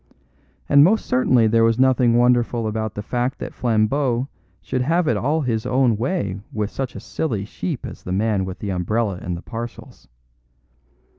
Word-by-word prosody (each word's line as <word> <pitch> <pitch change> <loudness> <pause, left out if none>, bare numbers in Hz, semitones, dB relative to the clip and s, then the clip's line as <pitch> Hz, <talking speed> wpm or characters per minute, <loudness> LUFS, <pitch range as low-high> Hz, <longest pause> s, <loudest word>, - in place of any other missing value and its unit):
And 140 0 +7
most 210 +7 +3
certainly 125 -2 +3
there 115 +1 +3
was 115 0 +3
nothing 125 -2 +4
wonderful 120 -1 +2
about 110 0 -3
the 105 - -5
fact 125 +4 -2
that - - -7
Flambeau 120 +3 0 0.3
should 130 - -3
have 165 +5 +1
it 120 - +2
all 145 +10 0
his 115 -5 -1
own 125 -3 +2
way 115 - -2
with 105 -1 -2
such 130 -2 -4
a - - -5
silly 110 -11 -3
sheep 145 - -5
as - - -8
the 90 - -7
man 100 0 +1
with 95 0 -5
the 100 +2 -4
umbrella 95 +2 -1
and 90 0 -4
the 85 - -10
parcels. 120 0 -8
115 Hz, 175 wpm, -21 LUFS, 105-130 Hz, 0.3 s, And